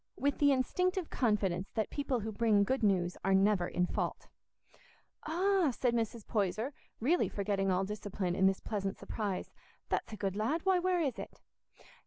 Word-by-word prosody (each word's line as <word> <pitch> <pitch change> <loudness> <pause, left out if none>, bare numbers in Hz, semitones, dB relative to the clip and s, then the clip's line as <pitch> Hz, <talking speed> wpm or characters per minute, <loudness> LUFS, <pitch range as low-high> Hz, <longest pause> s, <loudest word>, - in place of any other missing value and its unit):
with 285 +1 0
the 285 -1 +5
instinctive 360 - 0
confidence 195 -6 0
that 220 -2 -2
people 275 -4 -1
who 220 +2 -4
bring 215 -1 +3
good 260 +6 0
news 185 -4 +1
are 195 0 +3
never 195 -2 +3
in 180 - 0
fault. - - -3 1.0
"Ah," 365 +1 +2
said 245 0 0
Mrs. 230 -1 -2
Poyser, 215 +6 -1 0.3
really 310 +10 +2
forgetting 195 -1 -1
all 185 +1 +2
discipline 200 -3 -3
in 190 - +4
this 190 0 +1
pleasant 195 -3 -3
surprise, 205 -4 -4 0.4
"that's - - -1
a 215 - -6
good 195 -2 -2
lad; 240 +11 0
why, 380 -1 +4
where 360 -1 +1
is 270 -7 -1
it?" - - -8
215 Hz, 170 wpm, -33 LUFS, 195-280 Hz, 1.0 s, the